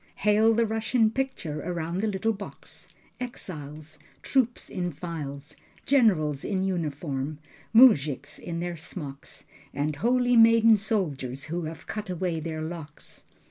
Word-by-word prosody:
Hail 215 Hz, +2 st, +4 dB
the 230 Hz, +1 st, +3 dB
Russian 220 Hz, +1 st, +1 dB
picture 225 Hz, -, -3 dB
around 170 Hz, 0 st, -3 dB
the 215 Hz, +3 st, 0 dB
little 215 Hz, +2 st, 0 dB
box: 200 Hz, -1 st, -10 dB, 0.3 s
Exiles, 155 Hz, -, -7 dB, 0.2 s
Troops 250 Hz, -3 st, +1 dB
in 175 Hz, -2 st, -3 dB
files, 150 Hz, -3 st, -6 dB, 0.3 s
Generals 175 Hz, -, +3 dB
in 190 Hz, -2 st, -1 dB
uniform, 150 Hz, -5 st, -2 dB, 0.3 s
Mujiks 150 Hz, -, +5 dB
in 170 Hz, -1 st, -5 dB
their 175 Hz, -1 st, -3 dB
smocks, 145 Hz, -4 st, -8 dB, 0.3 s
And 145 Hz, +1 st, -1 dB
holy 245 Hz, +4 st, +2 dB
maiden 230 Hz, 0 st, +7 dB
soldiers 150 Hz, -, -2 dB
who 175 Hz, -1 st, -2 dB
have 160 Hz, 0 st, -7 dB
cut 210 Hz, -2 st, -5 dB
away 180 Hz, -2 st, -1 dB
their 155 Hz, 0 st, -4 dB
locks. 160 Hz, -2 st, -8 dB
175 Hz, 130 wpm, -27 LUFS, 150-220 Hz, 0.3 s, maiden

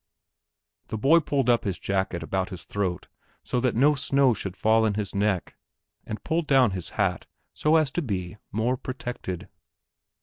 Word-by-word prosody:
The 110 Hz, -, -4 dB
boy 140 Hz, +10 st, +5 dB
pulled 140 Hz, -5 st, 0 dB
up 120 Hz, -1 st, +4 dB
his 95 Hz, -3 st, -2 dB
jacket 95 Hz, -3 st, -1 dB
about 95 Hz, +3 st, -1 dB
his 90 Hz, -3 st, -7 dB
throat 95 Hz, -3 st, -3 dB, 0.4 s
so 125 Hz, -, -1 dB
that 125 Hz, -2 st, +1 dB
no 140 Hz, +6 st, +5 dB
snow 140 Hz, -2 st, +3 dB
should 95 Hz, -3 st, -5 dB
fall 110 Hz, +1 st, +3 dB
in 105 Hz, -2 st, +1 dB
his 105 Hz, -2 st, -3 dB
neck, 100 Hz, -2 st, 0 dB, 0.5 s
and 110 Hz, -, -5 dB
pulled 165 Hz, -1 st, -1 dB
down 130 Hz, -6 st, +5 dB
his 90 Hz, -2 st, -4 dB
hat 95 Hz, -3 st, 0 dB, 0.3 s
so 155 Hz, +1 st, +2 dB
as 155 Hz, -4 st, +3 dB
to 175 Hz, -, -1 dB
be 95 Hz, -, -4 dB
more 115 Hz, +5 st, 0 dB
protected. 125 Hz, -9 st, -5 dB
110 Hz, 170 wpm, -26 LUFS, 95-135 Hz, 0.5 s, boy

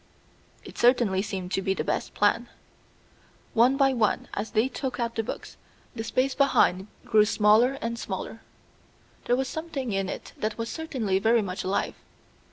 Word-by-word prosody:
It -, -, -11 dB
certainly 235 Hz, -6 st, +4 dB
seemed 190 Hz, -3 st, -5 dB
to 195 Hz, -, 0 dB
be 190 Hz, 0 st, 0 dB
the -, -, -2 dB
best -, -, -2 dB
plan. -, -, +2 dB, 1.0 s
One 245 Hz, +4 st, +4 dB
by 270 Hz, -1 st, +4 dB
one, 225 Hz, -4 st, 0 dB
as 205 Hz, +2 st, -3 dB
they 220 Hz, +3 st, +2 dB
took 260 Hz, -1 st, -4 dB
out 235 Hz, -1 st, -1 dB
the 225 Hz, -, -1 dB
books, 225 Hz, -, -7 dB, 0.4 s
the 225 Hz, -, -4 dB
space 260 Hz, +3 st, 0 dB
behind 205 Hz, -9 st, +3 dB, 0.2 s
grew 215 Hz, -2 st, +5 dB
smaller 215 Hz, +5 st, +4 dB
and 230 Hz, 0 st, -3 dB
smaller. -, -, -5 dB, 0.8 s
There 245 Hz, -, +3 dB
was 265 Hz, +1 st, -1 dB
something 315 Hz, -7 st, -4 dB
in 195 Hz, -1 st, -1 dB
it -, -, -7 dB
that 215 Hz, 0 st, -2 dB
was 230 Hz, 0 st, -3 dB
certainly 250 Hz, -, -1 dB
very 225 Hz, +2 st, +3 dB
much 185 Hz, -1 st, -4 dB
alive. 195 Hz, +2 st, -1 dB
230 Hz, 170 wpm, -26 LUFS, 205-255 Hz, 1.0 s, grew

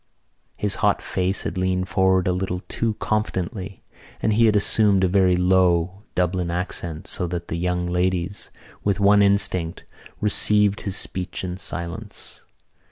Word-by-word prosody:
'" -, -, -46 dB
His 105 Hz, -1 st, -1 dB
hot 105 Hz, -1 st, +3 dB
face 95 Hz, +1 st, -2 dB
had -, -, -3 dB
leaned 95 Hz, 0 st, 0 dB
forward 95 Hz, 0 st, +2 dB
a -, -, +3 dB
little 90 Hz, 0 st, -2 dB
too 115 Hz, -2 st, -2 dB
confidentially 95 Hz, -3 st, -3 dB, 0.4 s
and 110 Hz, -, +1 dB
he 115 Hz, +2 st, +4 dB
had 105 Hz, -, +3 dB
assumed 100 Hz, -1 st, +3 dB
a -, -, +4 dB
very 90 Hz, -1 st, +3 dB
low 90 Hz, 0 st, +2 dB
Dublin 90 Hz, -1 st, 0 dB
accent 85 Hz, -2 st, -4 dB
so 90 Hz, -, -1 dB
that 85 Hz, 0 st, -5 dB
the -, -, -2 dB
young 90 Hz, +1 st, -1 dB
ladies, 90 Hz, +2 st, -1 dB, 0.3 s
with 100 Hz, -1 st, 0 dB
one 100 Hz, +1 st, +5 dB
instinct, 95 Hz, -4 st, +1 dB, 0.4 s
received 105 Hz, -1 st, +3 dB
his 100 Hz, -2 st, -2 dB
speech 90 Hz, -2 st, -3 dB
in 90 Hz, -1 st, -4 dB
silence. 85 Hz, -2 st, -6 dB
95 Hz, 155 wpm, -23 LUFS, 90-100 Hz, 0.4 s, one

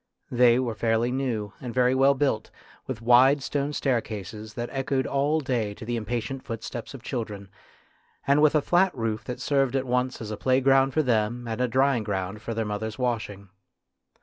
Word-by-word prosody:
They 120 Hz, -1 st, +5 dB
were 125 Hz, -3 st, -1 dB
fairly 115 Hz, +2 st, +1 dB
new 120 Hz, -6 st, -2 dB
and 125 Hz, -2 st, -6 dB
very 125 Hz, 0 st, +3 dB
well 135 Hz, +1 st, +4 dB
built, 135 Hz, -6 st, 0 dB, 0.4 s
with 115 Hz, -4 st, -5 dB
wide 130 Hz, +4 st, +5 dB
stone 145 Hz, 0 st, -1 dB
staircases 110 Hz, -6 st, -3 dB
that 120 Hz, 0 st, -4 dB
echoed 135 Hz, -1 st, -1 dB
all 145 Hz, +3 st, +1 dB
day 115 Hz, -7 st, -1 dB
to -, -, -9 dB
the 120 Hz, +1 st, -2 dB
impatient 120 Hz, +3 st, -3 dB
footsteps 115 Hz, +3 st, -6 dB
of 125 Hz, -, -11 dB
children, 105 Hz, -6 st, -5 dB, 0.8 s
and 140 Hz, +2 st, +4 dB
with 155 Hz, 0 st, +4 dB
a 150 Hz, -, +3 dB
flat 180 Hz, 0 st, +3 dB
roof 115 Hz, -1 st, -2 dB
that 125 Hz, -, -5 dB
served 135 Hz, -2 st, +1 dB
at 135 Hz, 0 st, 0 dB
once 125 Hz, +1 st, -1 dB
as 110 Hz, -2 st, -6 dB
a 105 Hz, -, -4 dB
playground 135 Hz, +2 st, +3 dB
for 155 Hz, -, +3 dB
them 120 Hz, -1 st, 0 dB
and 115 Hz, +2 st, -3 dB
a 125 Hz, -, +2 dB
drying 130 Hz, -1 st, +2 dB
ground 100 Hz, 0 st, -3 dB
for 115 Hz, +1 st, -5 dB
their 115 Hz, 0 st, -1 dB
mothers' 105 Hz, +1 st, -4 dB
washing. 110 Hz, -6 st, -3 dB
120 Hz, 185 wpm, -26 LUFS, 110-135 Hz, 0.8 s, They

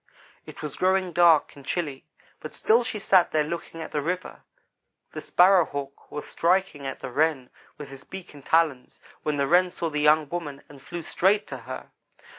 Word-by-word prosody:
It -, -, -10 dB
was 150 Hz, -2 st, -5 dB
growing 185 Hz, -1 st, +1 dB
dark 170 Hz, -3 st, +4 dB
and 140 Hz, -, -13 dB
chilly, 145 Hz, -2 st, -4 dB, 0.3 s
but 155 Hz, -, -8 dB
still 230 Hz, +3 st, +3 dB
she 230 Hz, -, -4 dB
sat 195 Hz, -4 st, +4 dB
there 155 Hz, -1 st, +1 dB
looking 165 Hz, +1 st, -6 dB
at -, -, -9 dB
the 150 Hz, -, -1 dB
river. 180 Hz, +4 st, -4 dB, 0.7 s
The -, -, -6 dB
Sparrow 185 Hz, 0 st, +5 dB
hawk 140 Hz, -2 st, -7 dB
was 150 Hz, -, -5 dB
striking 170 Hz, -5 st, 0 dB
at 135 Hz, -, -6 dB
the -, -, -6 dB
Wren 140 Hz, -2 st, 0 dB, 0.3 s
with 145 Hz, -2 st, -9 dB
his 135 Hz, -1 st, -11 dB
beak 190 Hz, -4 st, -10 dB
and 145 Hz, -2 st, -14 dB
talons, 155 Hz, -6 st, +1 dB, 0.2 s
when 150 Hz, -1 st, -1 dB
the 140 Hz, -, +1 dB
Wren 180 Hz, +4 st, +4 dB
saw 170 Hz, -2 st, -4 dB
the 150 Hz, 0 st, -1 dB
young 150 Hz, 0 st, +4 dB
woman 150 Hz, -5 st, -5 dB
and 140 Hz, -2 st, -15 dB
flew 170 Hz, +4 st, -7 dB
straight 195 Hz, +6 st, +2 dB
to 135 Hz, -, -5 dB
her. 130 Hz, -, -7 dB
155 Hz, 195 wpm, -26 LUFS, 145-180 Hz, 0.7 s, Sparrow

